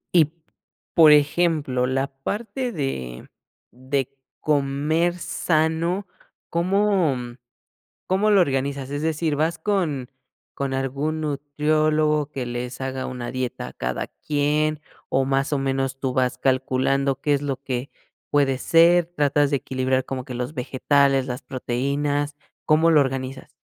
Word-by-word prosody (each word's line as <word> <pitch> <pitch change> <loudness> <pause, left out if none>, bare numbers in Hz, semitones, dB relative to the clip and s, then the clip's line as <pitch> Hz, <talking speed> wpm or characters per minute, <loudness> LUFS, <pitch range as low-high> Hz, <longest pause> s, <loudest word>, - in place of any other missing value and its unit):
Y, 155 -3 +5 0.6
por 160 -2 +8
ejemplo, 150 -4 +2
la 135 +1 0
parte 220 - -4
de 65 - -4 0.4
de 135 +1 -3 0.2
comer 150 +4 +1
sano, 170 +3 0 0.5
¿cómo, 185 -3 +2
mm, 120 0 -7 0.7
cómo 195 +3 +2
lo 200 -2 +6
organizas? 140 -3 0
Es 145 +1 -3
decir, 160 -1 0
¿vas 160 +3 0
con 155 -11 -1 0.4
con 135 -1 -2
algún 140 +4 -2
nutriólogo 150 +1 +1
que 135 -3 -4
les 120 +1 -5
haga 130 0 -3
una 125 -1 -5
dieta 130 -1 -3
a - - -12
cada 65 0 -3 0.2
quien 150 +1 +1 0.3
o 135 0 +2
más 135 +2 0
o - - 0
menos 135 0 -1
tú 130 -2 -1
vas 125 0 +1
calculando 135 +1 +1
qué 145 - +1
es 140 - 0
lo 135 -2 -3
que 130 0 -3 0.4
puede 140 -3 +2
ser? 170 +4 +5
¿Tratas 145 -4 +1
de 145 - +2
equilibrar 130 0 -1
como 130 -2 -5
que 125 - -6
los 125 +4 -4
vegetales, 135 +1 +2
las 125 +1 -5
proteínas? 145 +3 -2 0.3
¿Cómo 160 +2 +4
lo 155 -2 +6
organizas? 135 -1 -3
140 Hz, 135 wpm, -23 LUFS, 130-155 Hz, 0.7 s, por